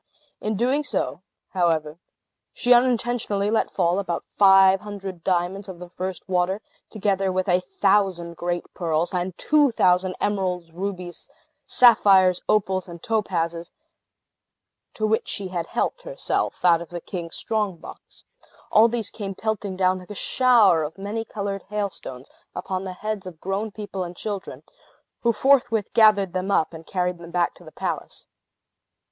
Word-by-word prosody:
In 215 0 -2
so - - -4 0.5
doing, - - -7 0.3
however, 165 -3 0 0.5
she 245 -1 +4
unintentionally 240 -4 +1
let 225 - +1
fall 175 0 +1
about 175 -4 -3
five 195 -1 +6
hundred 195 -4 -7
diamonds 185 +2 -1
of 185 - -8
the 175 0 -10
first 185 -1 -5
water, 185 +1 +1 0.3
together 195 -3 0
with 185 +1 -1
a 180 -1 +4
thousand 190 -2 +1
great 175 0 -2
pearls, 165 0 -1
and 180 0 -2
two 300 -2 +3
thousand 185 -4 +2
emeralds, 185 -4 -1
rubies, 180 0 -6 0.4
sapphires, 195 -7 +5
opals, 190 -3 +1
and 170 -1 -10
topazes, 170 -6 -1 1.3
to 215 - -1
which 220 +1 +1
she 195 -2 -3
had 175 -2 -3
helped - - -2
herself - - -2
out 170 -1 +5
of 170 - -9
the 175 - -5
king's 170 -1 -7
strong 210 -5 -2
box. - - -14 0.5
All 225 0 +7
these 230 -3 -2
came 195 -3 -6
pelting 210 -3 -3
down, 185 0 +2
like 180 - -14
a 210 - -7
shower 230 -9 +4
of 155 +3 -5
many 205 +3 -4
colored 200 -3 -4
hailstones, 195 -11 -5 0.3
upon 190 0 -3
the 185 - -5
heads 210 0 -4
of 170 -3 -10
grown 195 +5 -2
people 205 -3 -5
and 175 0 -8
children, 200 -3 -5 0.6
who 235 - +3
forthwith 245 -4 +2
gathered 210 -5 +5
them 185 +1 -2
up, 170 -4 +1
and 160 0 -11
carried 180 -1 -1
them 170 -1 -10
back 175 0 0
to - - -17
the 155 - -12
palace. - - -5
190 Hz, 155 wpm, -24 LUFS, 175-210 Hz, 1.3 s, All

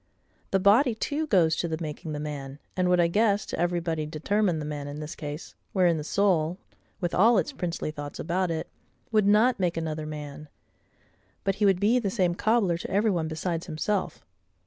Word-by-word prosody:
The 195 - +2
body 220 +6 +4
too 300 +7 -2
goes 170 - +4
to 170 - -1
the 160 -1 -2
making 155 0 -5
the 150 - -4
man, 140 -2 -5 0.2
and 180 -1 +1
would, 180 0 +4
I 170 - +5
guess, 205 +3 +2
to - - -5
everybody 170 -3 -1
determine 180 +4 0
the 150 - -4
man 145 -1 -5
in 145 +1 -6
this 155 0 -6
case, 150 +1 -7 0.2
wherein 180 -4 +3
the 150 - -4
soul, 175 -2 +1 0.4
with 175 -2 -2
all 225 +5 +5
its 180 - 0
princely 170 -3 -3
thoughts 145 -1 -7
about 180 +2 -1
it, 160 -1 -3 0.4
would 215 -2 +3
not 220 +3 +4
make 175 -3 0
another 155 -1 -3
man: 150 0 -7 0.9
but 195 0 0
he 210 - +2
would 190 -2 +3
be 220 +5 +3
the 210 -5 -1
same 185 -4 +1
cobbler 200 -3 +1
to - - -6
every 205 +3 +2
one 165 -4 -1
besides 165 +2 -3
himself. 185 +5 -2
175 Hz, 195 wpm, -27 LUFS, 155-200 Hz, 0.9 s, I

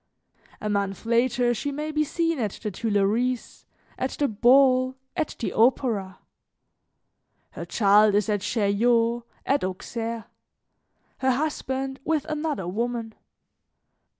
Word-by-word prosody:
A 210 - -4
month 200 -1 -2
later 240 +1 +2
she 285 +5 -3
may 300 +2 -4
be 305 0 +1
seen 330 0 -1
at 215 -5 -1
the 210 - -2
Tuileries, 225 +4 -1 0.3
at 260 - 0
the 290 - 0
ball, 255 +3 +4 0.2
at 320 -4 -2
the 230 - -3
opera: 220 -5 +1 1.3
her - - -7
child 210 0 +4
is 205 -1 +2
at 205 -2 0
Chaillot, 230 +3 +2 0.2
at 280 +1 +1
Auxerre; 225 +4 -4 0.9
her 260 - +1
husband 270 -2 -2
with 310 -2 0
another 305 - -3
woman. 230 +3 -3
240 Hz, 120 wpm, -25 LUFS, 210-270 Hz, 1.3 s, ball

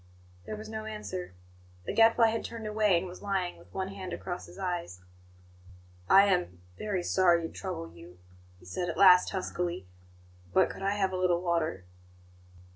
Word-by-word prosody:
There - - -4
was 215 +1 -8
no 220 0 -6
answer. 190 - -6 0.5
The - - -3
Gadfly 225 0 +5
had 225 0 -2
turned 230 -2 -7
away, 210 -3 +2
and 170 - -2
was 180 0 -9
lying 190 -3 -2
with - - -19
one 190 0 -3
hand 190 -2 -7
across 180 -1 -5
his - - -14
eyes. 175 - -4 1.1
"I 195 +1 +8
am 180 - 0
very 190 - -2
sorry 175 -2 +3
to 165 - -6
trouble 85 - -6
you," 85 +1 -14 0.4
he 90 - -19
said 130 - -3
at 165 - -4
last, 180 -2 +7
huskily; 180 - -3 0.7
"but - - +4
could - - -10
I 195 +1 0
have 190 -2 +1
a 185 - -2
little 180 -1 +1
water?" 165 - -1
185 Hz, 175 wpm, -29 LUFS, 170-200 Hz, 1.1 s, I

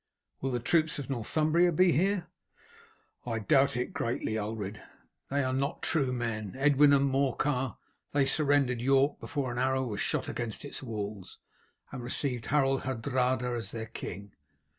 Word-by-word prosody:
"Will 135 - -1
the 125 -2 -1
troops 155 +5 +2
of 140 -1 -5
Northumbria 155 +8 +2
be 180 +2 +4
here?" 190 +2 +1 1.0
"I 115 -2 -2
doubt 135 +3 +3
it 125 - -2
greatly, 115 -2 -2
Ulred. 105 -1 -4 0.5
They 140 +1 +1
are 130 0 -1
not 140 +3 -2
true 140 -6 +1
men, 115 -5 -3
Edwin 145 +1 +5
and 140 0 +4
Morcar; 135 -2 0 0.3
they 140 -1 +3
surrendered 140 -4 +2
York 135 +2 +3
before 140 -5 -3
an 120 - -3
arrow 130 0 +1
was 105 -4 -3
shot - - -1
against 120 +2 -4
its 145 - -6
walls, 105 -5 -6 0.5
and 130 - -6
received 120 -1 -2
Harold 135 -2 +2
Hardrada 125 0 0
as 115 -5 -4
their 110 +1 -5
king. 100 -2 -7
130 Hz, 155 wpm, -30 LUFS, 115-140 Hz, 1.0 s, Edwin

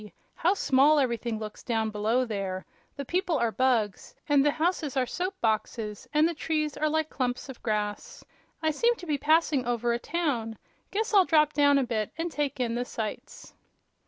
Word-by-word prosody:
How 360 +4 +1
small 285 -2 +4
everything 235 -4 0
looks 215 -1 -7
down 225 -2 -1
below 220 +5 +1
there. 195 -4 -4 0.3
The 280 - -5
people 355 +1 0
are 235 -3 +1
bugs, 235 -5 0
and 290 -2 +4
the 295 - +4
houses 315 -3 -1
are 255 - +3
soap 370 +8 -4
boxes, 215 -1 -2
and 305 +2 +4
the 340 - -2
trees 305 -2 -2
are 310 +1 0
like 315 0 -1
clumps 255 0 -2
of 260 - -9
grass. 210 -2 -3 0.4
I 315 - +3
seem 470 +10 +2
to 360 - -10
be 295 -4 -1
passing 310 -3 +3
over 240 0 0
a 235 - -1
town. 245 -9 -2 0.3
Guess 440 +2 -2
I'll 390 -3 +6
drop 305 -2 +3
down 285 0 +4
a 275 - +2
bit, 220 -4 -2
and 335 +1 -2
take 290 -3 -2
in 240 -2 0
the 240 +1 -1
sights." 220 -3 -6
270 Hz, 190 wpm, -28 LUFS, 230-310 Hz, 0.4 s, I'll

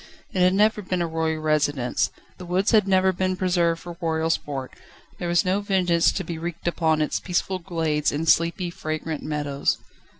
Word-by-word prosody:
It 185 - -1
had 180 +1 +4
never 210 +1 +3
been 185 -2 -1
a - - 0
royal 160 -1 -1
residence, 145 -5 +1 0.3
the 180 - -7
woods 185 +3 +1
had 215 -3 +4
never 190 0 +3
been 185 +1 0
preserved 175 -3 +1
for 175 -1 -8
royal 160 -1 0
sport: 135 -5 -3 0.5
there 175 - -3
was 175 +1 +2
no 185 +2 +2
vengeance 180 -4 +2
to 190 - -2
be 165 -1 -5
wreaked 170 0 -5
upon 160 -2 +2
its - - -1
peaceful 185 +1 -1
glades 160 -4 0
and 160 +3 -3
sleepy, 170 +2 +2
fragrant 155 -3 -4
meadows. 145 -2 -1
170 Hz, 185 wpm, -24 LUFS, 160-185 Hz, 0.5 s, had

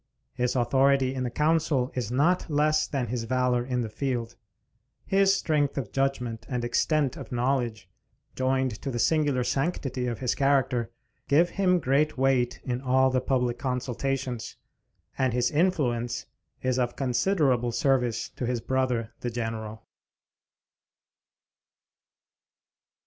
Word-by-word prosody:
His 125 +1 -1
authority 130 +2 +3
in 130 - -3
the 125 - -1
council 150 -2 +1
is 120 -4 -3
not 160 +9 +1
less 155 +1 +2
than 135 -4 -2
his 120 0 -3
valor 125 0 +1
in 125 -1 -1
the 115 - -2
field. 120 0 -3 0.7
His 195 0 +4
strength 145 -5 0
of 125 -7 -3
judgment 130 -4 -1
and 125 -3 -2
extent 145 +2 +1
of - - -9
knowledge, 120 -4 -1 0.5
joined 130 0 +1
to - - -4
the 120 - -3
singular 140 +1 +2
sanctity 135 -3 -1
of 120 -2 -2
his 125 -2 0
character, 130 -4 +1 0.4
give 165 +5 +4
him 185 -2 +2
great 150 +1 +1
weight 130 -2 +1
in 125 -1 -3
all 130 0 +3
the 130 0 +1
public 125 -2 0
consultations; 125 -1 -3 0.6
and 130 -3 +2
his 125 0 +1
influence 135 -8 0 0.4
is 130 0 +1
of 120 -1 -1
considerable 130 -2 +1
service 125 -3 +1
to 125 - -5
his 125 -1 -1
brother 125 -2 -1
the 120 - -3
General. 115 -2 -5
130 Hz, 135 wpm, -27 LUFS, 120-140 Hz, 0.7 s, His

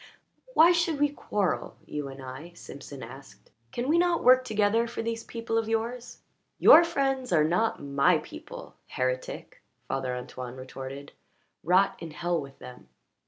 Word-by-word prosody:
"Why 330 +2 +8
should 335 -3 +1
we 290 0 +3
quarrel 205 -8 -2
you 150 -1 -5
and 135 0 -9
I?" 135 +7 -9
Simpson 140 -3 -10
asked. 135 +2 -13 0.2
"Can 240 +2 -3
we 325 +4 +3
not 350 -1 +2
work 255 +1 +6
together 215 0 +1
for 230 - -5
these 230 0 -3
people 230 -1 -2
of 225 -1 -3
yours?" 235 +2 -3 0.3
"Your 330 - +9
friends 270 - -1
are 155 -3 +4
not 180 +8 0
my 140 +5 +3
people, 320 - -10
heretic!" - - -4 0.3
Father 130 -2 -2
Antoine 125 0 -7
retorted." 135 +2 -8 0.5
Rot 185 +4 +3
in 165 - -7
hell 175 +2 -2
with 135 -1 -11
them!" 125 - -12
210 Hz, 155 wpm, -28 LUFS, -, 0.5 s, Your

